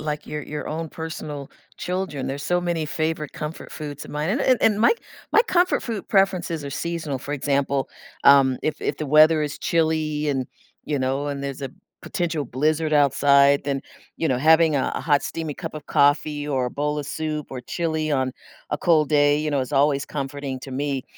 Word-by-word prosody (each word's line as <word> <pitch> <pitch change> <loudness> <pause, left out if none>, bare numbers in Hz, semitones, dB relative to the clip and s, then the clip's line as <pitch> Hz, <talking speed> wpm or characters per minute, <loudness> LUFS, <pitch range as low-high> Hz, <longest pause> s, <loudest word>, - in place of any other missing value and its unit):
like 150 -1 -4
your-your 150 0 -5
own 160 +1 -4
personal 155 -3 -6 0.3
children, 180 -6 -3
there's 140 +2 -4
so 175 0 +1
many 170 -2 -1
favorite 155 0 -2
comfort 150 +1 -6
foods 145 -2 -7
of - - -11
mine, 150 +4 -2
and 245 +8 0
and 255 -3 +3
and 210 -1 +3
my 235 - +6 0.4
my 435 - +6
comfort 365 -5 +2
food 225 -5 -5
preferences 190 -6 +1
are 140 - -5
seasonal, 160 -2 -3
for 145 - -5
example, 140 -1 0 0.4
um, 135 -2 +6
if 155 - -1
if 145 - -1
the 155 - -4
weather 155 +2 +6
is 145 -1 -4
chilly 155 -2 0
and, 135 -3 -1 0.4
you 145 - -1
know, 135 +2 -1
and 140 -1 -4
there's 140 0 -5
a 135 - -4 0.3
potential 165 -6 -2
blizzard 155 +5 0
outside, 140 0 +5
then, 140 -1 -1 0.4
you 165 - -1
know, 130 -4 +1
having 160 +2 +5
a 135 - +1
a - - -2
hot 145 0 +2
steamy 160 -3 -4
cup 165 -1 -7
of 150 - -8
coffee 145 +1 +2
or 130 -3 0
a - - -4
bowl 150 +2 -2
of 145 - -4
soup 155 -1 -3
or 130 - -5
chili 155 +3 -2
on 130 -2 0 0.4
a - - 0
cold 155 -4 +3
day, 145 -1 +4
you 155 0 -2
know, 140 - +2
is 130 +2 -4
always 140 0 +3
comforting 140 -1 -4
to 135 - -8
me. 135 -1 -2
150 Hz, 200 wpm, -23 LUFS, 140-160 Hz, 0.4 s, my